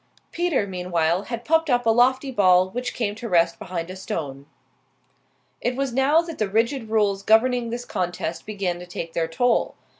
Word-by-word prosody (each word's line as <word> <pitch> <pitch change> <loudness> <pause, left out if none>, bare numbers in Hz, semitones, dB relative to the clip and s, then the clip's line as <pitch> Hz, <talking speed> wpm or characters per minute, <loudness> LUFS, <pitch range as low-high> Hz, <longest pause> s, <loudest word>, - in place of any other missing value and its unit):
Peter, 340 -10 0
meanwhile, 180 -1 -1
had 235 0 -6
popped 325 0 +2
up 245 -2 +2
a - - +3
lofty 260 +3 +3
ball 185 -5 +4
which 245 +3 -4
came 210 -4 -1
to 230 +2 -7
rest 170 -2 +2
behind 175 -3 -5
a - - -7
stone. 140 -7 -5 1.1
It 245 - -1
was 270 -2 -2
now 275 +6 +4
that 335 -2 -8
the 215 -2 0
rigid 225 +3 0
rules 205 -3 +1
governing 235 +3 +3
this 240 +1 -5
contest 175 -3 -4
began 195 -5 -2
to 180 - -10
take 170 -2 -6
their 165 -1 0
toll. 230 +9 +1
215 Hz, 180 wpm, -23 LUFS, 180-245 Hz, 1.1 s, ball